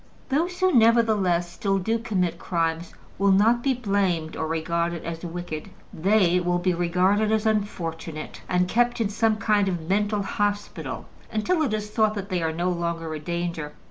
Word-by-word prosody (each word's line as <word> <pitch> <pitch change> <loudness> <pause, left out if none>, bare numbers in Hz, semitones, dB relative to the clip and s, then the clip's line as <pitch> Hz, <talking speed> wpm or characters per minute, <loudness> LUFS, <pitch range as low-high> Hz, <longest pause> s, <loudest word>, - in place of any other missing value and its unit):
Those 340 +6 0
who 370 -1 +3
nevertheless 220 -7 +4
still 195 -1 0
do 225 +5 0
commit 185 -6 -1
crimes 165 -1 -2 0.2
will 200 0 +4
not 225 +5 +4
be 265 +1 +1
blamed 195 -8 0
or 160 - -2
regarded 170 +1 -1
as 165 0 -5
wicked; 175 -2 -5 0.2
they 180 0 +3
will 175 0 +1
be 180 +1 +1
regarded 185 +5 +2
as 220 0 +1
unfortunate, 165 -7 -3
and 180 0 +2
kept 240 +4 +1
in 220 -3 +1
some 220 +1 +2
kind 210 -2 +2
of 175 -4 -3
mental 205 +2 +1
hospital 205 +1 -3 0.3
until 315 +11 +1
it 280 -7 +1
is 210 0 -5
thought 215 -1 +2
that 200 0 -5
they 180 -2 -1
are 160 -1 0
no 175 +3 -1
longer 170 -2 -3
a 155 - -4
danger. 170 -2 -3
190 Hz, 175 wpm, -25 LUFS, 170-215 Hz, 0.3 s, nevertheless